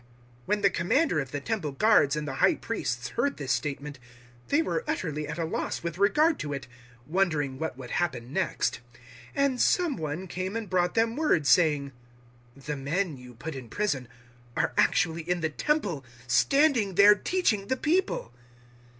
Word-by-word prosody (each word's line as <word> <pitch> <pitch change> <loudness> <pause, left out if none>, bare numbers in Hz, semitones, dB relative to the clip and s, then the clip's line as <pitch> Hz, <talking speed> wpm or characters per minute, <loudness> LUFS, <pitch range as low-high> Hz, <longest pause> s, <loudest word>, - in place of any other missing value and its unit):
005:024 120 - -28 0.4
When 210 0 +1
the 200 - +5
Commander 175 - +1
of 135 -3 -3
the 145 - -3
Temple 180 -3 -3
Guards 150 -5 +4
and 150 0 -3
the 135 - -3
High 330 - +4
Priests - - -3
heard 280 - -1
this 135 -3 -3
statement, 145 -1 -3 0.5
they 320 +3 +2
were 480 +8 -2
utterly 155 - -2
at - - -5
a 165 - -1
loss 160 - -3
with 170 +1 -4
regard 300 +11 +3
to 145 -1 -3
it, 140 -2 -6 0.4
wondering 155 -6 0
what 160 -5 -3
would 130 -2 -9
happen 130 -7 -2
next. 185 -3 0 0.6
005:025 280 - +4
And 260 -3 0
some 345 - +2
one 155 +3 -4
came 185 +4 -4
and 220 -4 -4
brought 180 -1 +1
them 225 0 +2
word, 290 - +2
saying, 145 -2 +3 0.6
"The 140 +2 -5
men 150 +3 -2
you 125 -1 -13
put 155 +7 -6
in 130 -4 -8
prison 140 - -1 0.5
are - - +1
actually 165 -3 +2
in 175 +1 -2
the 160 - 0
Temple, 200 - -1 0.2
standing 230 - +3
there, 205 +2 +8
teaching 210 - 0
the 260 - 0
people." 315 - 0
170 Hz, 175 wpm, -27 LUFS, 145-220 Hz, 0.6 s, there